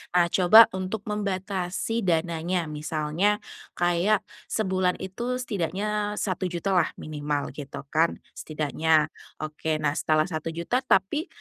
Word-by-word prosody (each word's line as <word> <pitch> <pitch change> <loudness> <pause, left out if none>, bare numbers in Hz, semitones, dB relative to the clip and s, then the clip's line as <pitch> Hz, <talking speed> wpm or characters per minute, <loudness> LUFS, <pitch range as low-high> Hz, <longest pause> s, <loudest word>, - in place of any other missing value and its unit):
Nah 175 -1 +6
coba 215 +5 +8
untuk 190 +3 -4
membatasi 195 +1 -2
dananya. 170 +1 0
Misalnya, 155 +7 0 0.3
kayak 175 +5 +2 0.2
sebulan 185 -3 0
itu 235 +7 -3
setidaknya 210 -2 -2
1.000.000 185 -1 -2
lah 180 -4 +3
minimal 145 -1 -3
gitu 140 -1 -8
kan, 165 +2 +2 0.2
setidaknya. 155 +1 0 0.3
Oke, 155 +1 -2
nah 145 - +3
setelah 155 -1 +2
1.000.000 165 +7 -2
tapi, 265 - +1
180 Hz, 110 wpm, -26 LUFS, 155-200 Hz, 0.3 s, coba